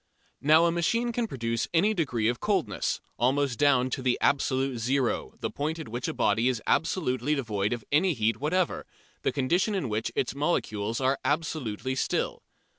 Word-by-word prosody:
Now 155 +4 +5
a 170 - +3
machine 230 +8 +1
can 235 0 -1
produce 115 - -2
any 205 +6 +4
degree 130 - 0
of 120 0 0
coldness, - - -1 0.2
almost 130 +1 +1
down 135 -3 +3
to 135 - -2
the 125 -1 +1
"absolute 135 -2 +1
zero," 130 +2 0
the - - -2
point 155 +3 -2
at 160 -7 -7
which 120 +2 -3
a - - -2
body 110 +4 +2
is 125 -3 -1
absolutely 150 -5 +1
devoid 105 -7 -1
of 120 -2 -3
any 165 +3 +3
heat 110 -1 +1
whatever, 170 +5 0 0.3
the - - +1
condition 175 +10 +1
in 150 -11 -2
which 110 +1 -2
its 130 - 0
molecules 115 -7 -1
are 135 +1 +1
absolutely 135 -6 -1
still. 130 - -1
135 Hz, 175 wpm, -28 LUFS, 120-160 Hz, 0.3 s, Now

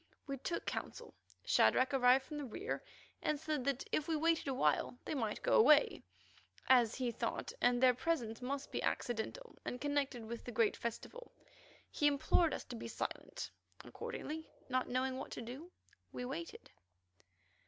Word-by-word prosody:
We 275 -1 -4
took 335 +6 -3
counsel. - - -5 0.3
Shadrach 255 +1 +4
arrived 260 0 +5
from 300 +1 -6
the 290 - -4
rear, 355 - -4 0.4
and 305 -1 0
said 305 -3 -2
that 275 -2 -1
if 305 - 0
we 325 - +1
waited 325 0 +2
awhile 245 - +1
they - - -2
might 225 -7 -2
go - - +2
away, 305 -9 +6 0.7
as 245 -4 +5
he 250 -2 -1
thought 475 - -3
that 245 0 +4
their 255 0 +6
presence 245 -5 -1
must 275 +2 -3
be - - -2
accidental 245 - -3
and 245 - -4
connected 285 -5 -1
with 235 +1 -6
the 245 - -6
great 225 -1 +3
festival. 360 - -6 0.6
He 295 - +3
implored 290 +3 +3
us - - -3
to 245 - -8
be 230 - -6
quite - - -2
silent. - - -8 0.3
Accordingly, 315 +1 -6 0.2
not 255 0 0
knowing 255 +1 0
what 275 - -6
to - - -5
do, 270 +10 -8 0.4
we 250 - -4
waited. 325 +7 -6
265 Hz, 165 wpm, -36 LUFS, 245-305 Hz, 0.7 s, away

